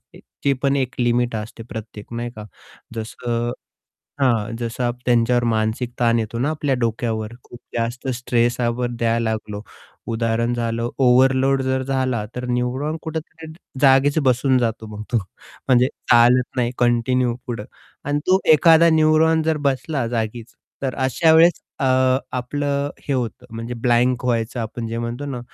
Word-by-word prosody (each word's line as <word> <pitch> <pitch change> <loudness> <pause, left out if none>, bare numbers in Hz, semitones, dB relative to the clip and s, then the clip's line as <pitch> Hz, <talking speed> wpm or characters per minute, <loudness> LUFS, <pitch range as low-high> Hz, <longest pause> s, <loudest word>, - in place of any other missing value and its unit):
ए - - -13 0.2
ची 140 - +3
पण 140 0 +2
एक 130 -3 -1
लिमिट 120 -1 +1
असते 110 +1 -6
प्रत्येक 110 -2 -8
नाही 120 +1 -3
का? 105 -1 -8 0.5
जसं 115 +1 -3 0.7
हां. 115 -4 +1
जसा 120 +1 -3
आप 120 0 -2
त्यांच्यावर 120 0 +3
मानसिक 110 +2 -1
ताण 115 -1 +3
येतो 115 +1 -3
ना, 135 +5 0
आपल्या 145 -3 -1
डोक्यावर 115 -2 -2
खूप 120 - -13 0.2
जास्त 120 +3 -3
स्ट्रेस 120 0 0
आपण 120 0 -1
द्यायला 115 -1 0
लागलो. 105 -2 -5 0.5
उदाहरण 115 +1 0
झालं 115 0 -2
ओव्हरलोड 135 +1 +4
जर 130 0 0
झाला, 130 -4 -1
तर 125 - -5
न्यूरॉन 125 +5 -1
कुठेतरी 160 0 -7 0.3
जागेच 140 +2 +5
बसून 130 +1 +3
जातो 115 -2 -2
मग 105 - -6
तो. 120 - +4 0.5
म्हणजे 125 -1 +5 0.2
चालत 120 +2 +4
नाही 120 -1 +1
कंटिन्यू 120 +1 +2
पुढं 115 -4 -4 0.4
आणि 145 +1 0
तो 185 +1 +5
एखादा 165 +2 +6
न्यूरॉन 160 0 +4
जर 160 0 +1
बसला 135 -1 -1
जागीच, 115 0 -4 0.3
तर 130 -2 -1
अशा 160 +5 +3
वेळेस 165 +1 +5 0.2
अ, 135 - 0 0.5
आपलं 140 +3 -2 0.2
हे - - +1
होतं 125 -3 -3
म्हणजे 115 +2 -5
ब्लँक 120 +1 +1
व्हायचं 120 0 -1
आपण 115 +1 -5
जे 115 +1 -4
म्हणतो 120 +4 -4
ना, 130 -3 -4
120 Hz, 155 wpm, -21 LUFS, 115-135 Hz, 0.7 s, एखादा